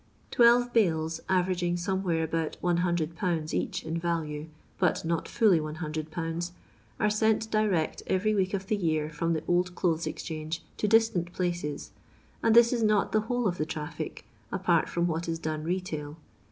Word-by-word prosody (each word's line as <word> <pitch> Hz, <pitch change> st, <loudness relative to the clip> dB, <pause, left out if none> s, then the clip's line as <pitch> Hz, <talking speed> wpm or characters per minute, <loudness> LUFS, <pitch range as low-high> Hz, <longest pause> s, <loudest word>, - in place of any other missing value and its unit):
Twelve 240 Hz, 0 st, +5 dB
bales, 165 Hz, -7 st, +1 dB
averaginff 180 Hz, -1 st, +1 dB
somewhere 180 Hz, -2 st, 0 dB
about 160 Hz, 0 st, -2 dB
lOOL 170 Hz, -2 st, 0 dB
each -, -, -2 dB
in 165 Hz, +1 st, -2 dB
value, 160 Hz, -3 st, -2 dB, 0.3 s
but 180 Hz, -3 st, +1 dB
not 165 Hz, 0 st, -1 dB
fully 215 Hz, -8 st, +4 dB
100/., 160 Hz, +2 st, -4 dB, 0.5 s
are 210 Hz, -, +3 dB
sent 220 Hz, +1 st, +1 dB
direct 205 Hz, -7 st, +1 dB
every 205 Hz, +3 st, +1 dB
week 190 Hz, -1 st, +1 dB
of 195 Hz, 0 st, -4 dB
the 215 Hz, -, 0 dB
year 155 Hz, -5 st, 0 dB
from 165 Hz, +2 st, -1 dB
the 155 Hz, -1 st, -2 dB
Old 175 Hz, 0 st, +1 dB
Clothea 165 Hz, -2 st, 0 dB
Exchange 160 Hz, 0 st, -5 dB
to 210 Hz, -, 0 dB
distant 210 Hz, -6 st, +3 dB
pkoes, 175 Hz, -5 st, -3 dB, 0.5 s
and 225 Hz, -, +3 dB
this 235 Hz, +1 st, +7 dB
is 240 Hz, -, 0 dB
not 215 Hz, -2 st, +2 dB
the 215 Hz, -, +3 dB
whole 245 Hz, +1 st, 0 dB
of 180 Hz, -2 st, -2 dB
the 155 Hz, -, +1 dB
traffic, 155 Hz, -3 st, -5 dB, 0.3 s
apart 180 Hz, -4 st, +2 dB
from 170 Hz, 0 st, 0 dB
what 170 Hz, 0 st, -2 dB
is 165 Hz, -, -1 dB
done 155 Hz, -1 st, -3 dB
retail. 160 Hz, -4 st, -3 dB
175 Hz, 160 wpm, -28 LUFS, 160-195 Hz, 0.5 s, this